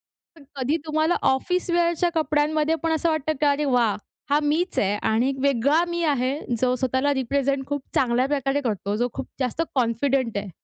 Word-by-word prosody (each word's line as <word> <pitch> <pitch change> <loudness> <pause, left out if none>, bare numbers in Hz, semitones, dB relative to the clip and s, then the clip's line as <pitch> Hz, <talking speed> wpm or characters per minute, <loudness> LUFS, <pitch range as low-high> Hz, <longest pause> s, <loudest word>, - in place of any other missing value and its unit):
तर 320 -4 -21
कधी 275 +4 0
तुम्हाला 315 +2 +1 0.2
ऑफिस 360 +8 -1
वेअरच्या 345 0 +2
कपड्यांमध्ये 305 0 +1
पण, 330 - +1
असं 320 +1 +1
वाटतं 310 0 0
की 295 - +3
अरे 290 +1 +2
वाह! 240 -5 +2 0.3
हा 290 +1 +3
मीच 320 +5 0
आहे 200 +1 +1
आणि 230 +4 +2
एक 275 - -2
वेगळा 280 +5 +3
मी 345 0 -2
आहे 275 -1 0 0.2
जो 250 0 +2
स्वतःला 260 +3 0
रिप्रेझेंट 270 +1 -1
खूप 285 -1 -2
चांगल्या 250 0 +2
प्रकारे 280 0 0
करतो. 210 -4 -2
जो 240 +3 0
खूप - - -5
जास्त 255 +5 -1
कॉन्फिडंट 250 -1 0
आहे. 200 -1 -4
280 Hz, 180 wpm, -24 LUFS, 250-310 Hz, 0.3 s, की